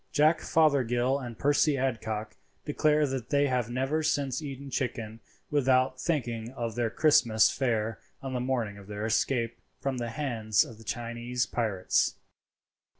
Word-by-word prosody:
Jack 155 +2 +4
Fothergill 135 -4 +2
and 120 -4 -7
Percy 145 0 +3
Adcock 110 -4 -2 0.3
declare 150 0 +2
that 130 -4 -4
they 145 0 +3
have 125 -4 0
never 135 +5 0
since 140 -3 0
eaten 140 -2 -7
chicken 115 -4 -3 0.3
without 130 -2 +2
thinking 120 -8 -1
of 115 -3 -3
their 120 0 0
Christmas 115 -5 +4
fare 115 -4 -1 0.2
on 135 -1 -5
the 125 - -1
morning 120 -5 -2
of 100 - -13
their 105 +1 -4
escape 115 +1 0 0.2
from 135 -2 -2
the 120 -1 -3
hands 110 -5 +1
of 115 -2 -12
the - - -12
Chinese 120 +2 -2
pirates. 110 -7 0
125 Hz, 150 wpm, -29 LUFS, 115-140 Hz, 0.3 s, Jack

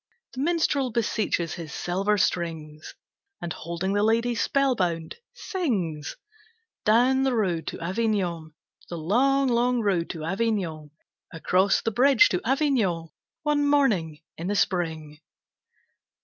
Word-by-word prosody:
The 255 - -7
minstrel 295 -4 +1
beseeches 215 -7 -1
his 165 -4 -7
silver 195 +6 0
strings, 160 -5 -2 0.4
And 170 -2 -4
holding 170 +4 -3
the 205 - +2
lady 230 +3 +2
spellbound, 210 -11 0 0.2
sings: 200 - -3 0.7
Down 245 +5 +4
the 265 -2 +1
road 180 -7 -1
to - - -5
Avignon, 180 -5 -2 0.3
The 170 - -5
long, 265 - +2
long 245 0 +2
road 190 -6 0
to 160 -3 -6
Avignon, 180 -5 -2 0.4
Across 185 +4 +1
the 225 - 0
bridge 275 - +5
to - - -1
Avignon, 235 - 0 0.3
One 295 -1 +1
morning 195 - +1 0.2
in 170 - -4
the 205 - -1
spring. 160 -6 -1
200 Hz, 120 wpm, -25 LUFS, 165-250 Hz, 0.7 s, bridge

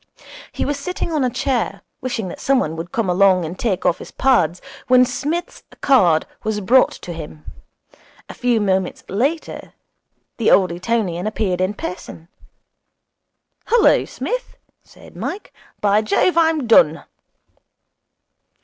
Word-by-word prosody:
He - - -3
was 285 0 -2
sitting 360 +2 -4
on 305 -4 0
a 255 - +2
chair, 245 0 -2 0.2
wishing 240 -6 -3
that - - -9
somebody 255 - +1
would 165 +2 -7
come 230 -4 -1
along 185 -1 +3
and 170 +3 -7
take 200 -6 -1
off 170 - +2
his - - -10
pads, 185 - +2 0.3
when 255 0 +6
Psmith's 295 +8 -4 0.2
card 180 - +4 0.2
was 215 -1 -1
brought 245 +6 +4
to 175 - -6
him. 155 -1 -10 0.8
A - - -9
few 245 -2 +1
moments 190 -3 -1
later 275 - -2 0.6
the 230 - +2
old 185 -3 +4
Etonian 180 0 -2
appeared 195 -4 -1
in 190 +3 0
person. 175 -3 -8 1.4
'Hullo, 470 -1 +4
Smith,' - - -5 0.3
said - - -17
Mike, 415 - -6 0.3
'By 205 +1 +3
Jove! 220 +11 +1
I'm 320 -4 +2
done.' 165 -9 +4
215 Hz, 135 wpm, -20 LUFS, 180-260 Hz, 1.4 s, when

